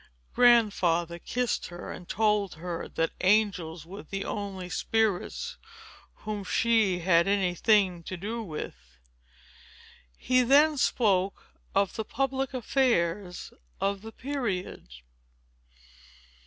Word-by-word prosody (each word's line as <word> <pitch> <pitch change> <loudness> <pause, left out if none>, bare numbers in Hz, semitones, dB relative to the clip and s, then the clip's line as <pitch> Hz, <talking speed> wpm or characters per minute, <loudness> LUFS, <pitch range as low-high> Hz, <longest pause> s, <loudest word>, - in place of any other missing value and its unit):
Grandfather 185 -8 +3
kissed 245 +5 -2
her, 175 0 -8
and 180 - -10
told 210 -3 +1
her 170 +1 -5
that 165 0 -1
angels 180 -5 +1
were 195 +5 -9
the 195 +5 -5
only 195 -3 -4
spirits 225 - -1 0.7
whom 210 -1 -3
she 220 -1 +2
had 170 0 +4
any 195 -3 +2
thing 190 -2 +3
to 185 +2 -6
do 220 +6 -4
with. 65 - -8 1.2
He 255 0 +2
then 290 +5 +5
spoke 200 -7 +1 0.3
of 200 -1 +2
the 220 - -1
public 270 +3 -2
affairs 210 -8 0 0.3
of 195 0 -1
the 225 +1 -9
period. 240 - -4
200 Hz, 110 wpm, -28 LUFS, 180-230 Hz, 1.2 s, then